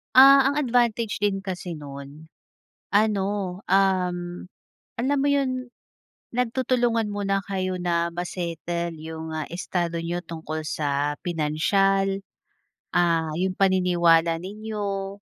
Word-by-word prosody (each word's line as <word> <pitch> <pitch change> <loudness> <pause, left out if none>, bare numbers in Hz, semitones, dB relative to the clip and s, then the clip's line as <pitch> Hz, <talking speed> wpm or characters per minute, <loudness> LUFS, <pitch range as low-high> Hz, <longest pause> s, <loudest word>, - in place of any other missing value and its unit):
Ah, 275 +1 +9
ang 275 - +3
advantage 235 -4 +1
din 200 -1 0
kasi 180 -2 -5
no'n, 145 +1 -10 0.6
ano, 205 -2 +3 0.4
um, 185 -2 +2 0.8
alam 265 +5 +1
mo 275 - +1
'yon, 255 -3 0 0.7
nagtutulungan 240 -2 +1
muna 200 -1 0
kayo 185 -1 -2
na 170 -1 0
ma-settle 170 -1 -3
yung, 160 0 -7
ah, 155 -1 -3
estado 170 -1 -2
niyo 170 +1 -2
tungkol 160 -1 -5
sa 145 -1 -1
pinansiyal, 195 +5 +1 0.8
ah, 165 -2 +2
yung 185 0 0
paniniwala 175 -3 +3
ninyo, 200 -1 -4
185 Hz, 105 wpm, -25 LUFS, 165-210 Hz, 0.8 s, Ah